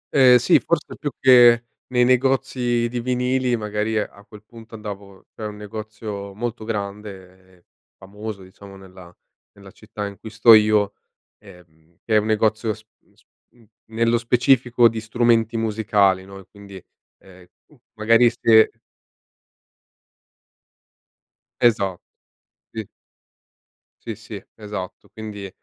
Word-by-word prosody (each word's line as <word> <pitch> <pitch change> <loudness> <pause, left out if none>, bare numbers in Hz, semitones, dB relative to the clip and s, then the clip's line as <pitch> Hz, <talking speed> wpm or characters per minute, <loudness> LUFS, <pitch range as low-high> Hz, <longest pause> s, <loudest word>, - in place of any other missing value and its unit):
Ehm, 130 -3 +7
sì 125 +9 +3
forse 170 -2 -2
più 145 - -4
che 120 -2 +6 0.2
nei 125 -1 +2
negozi 125 -2 +1
di 120 +1 -4
vinili 125 0 0
magari 105 +1 -2
a 100 -1 -5
quel 105 -1 -15
punto 115 0 -14
andavo 100 -3 -10
c'é 110 - -10
un 105 - -8
negozio 105 -1 -8
molto 115 0 -5
grande 100 -3 -7
e 85 - -31 0.3
famoso, 100 +1 -9
diciamo, 100 +1 -14
nella 95 -2 -15 0.4
nella 100 -2 -15
città 105 -1 -8
in 100 -2 -9
cui 110 - -9
sto 110 +1 +6
io, 105 -2 +4 0.5
ehm, 85 -4 -20
che 110 - 0
è - - +6
un 105 - -4
negozio 110 0 0
s 110 - -18 0.2
mhmm, - - -34
s - - -28 0.3
mhmm, 115 - -23 0.2
nello 115 +1 0
specifico 120 0 +3
di 115 0 -3
strumenti 115 0 +1
musicali, 105 -4 +1
no, 95 0 -12
e 95 - -15
quindi, 100 -2 -13 0.4
ehm, 90 -2 -18 0.2
m - - -20 0.2
magari 115 +2 +4
se 110 -2 +4 2.9
Esa 100 -6 +2 0.8
sì. 110 -3 -5 1.2
Sì, - - -5
sì - - -10
esatto 105 -4 -8
quindi, 105 -3 -8
110 Hz, 130 wpm, -21 LUFS, 100-120 Hz, 2.9 s, Ehm